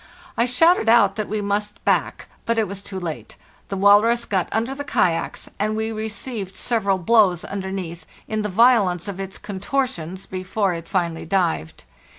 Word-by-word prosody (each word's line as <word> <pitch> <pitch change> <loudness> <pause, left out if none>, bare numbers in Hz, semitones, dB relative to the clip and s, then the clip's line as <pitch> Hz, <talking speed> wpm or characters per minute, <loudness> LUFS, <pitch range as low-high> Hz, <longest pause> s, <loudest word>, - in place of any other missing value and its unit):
I 235 - +2
shouted 250 +1 +4
out 205 -4 +5
that 215 -1 -3
we 215 0 -1
must 205 +1 -3
back, - - 0 0.2
but 230 0 +1
it 220 -2 +2
was 195 +1 -6
too 195 -1 -6
late: 165 -4 -6 0.3
the 195 - -3
walrus 210 +4 +5
got 190 -5 -1
under 230 +4 -1
the 285 +1 -5
kayaks, 175 -11 0
and 215 +1 0
we 220 +1 -2
received 220 -2 -4
several 200 -5 +1
blows 185 -2 +3
underneath, 190 -3 -5 0.2
in 215 0 -2
the 210 - -2
violence 205 -4 +3
of 195 -2 -5
its 195 -1 -5
contortions, 195 - -3
before 185 +1 -1
it 165 -1 -7
finally 170 -4 -1
dived. 165 - -1
200 Hz, 165 wpm, -22 LUFS, 185-225 Hz, 0.3 s, out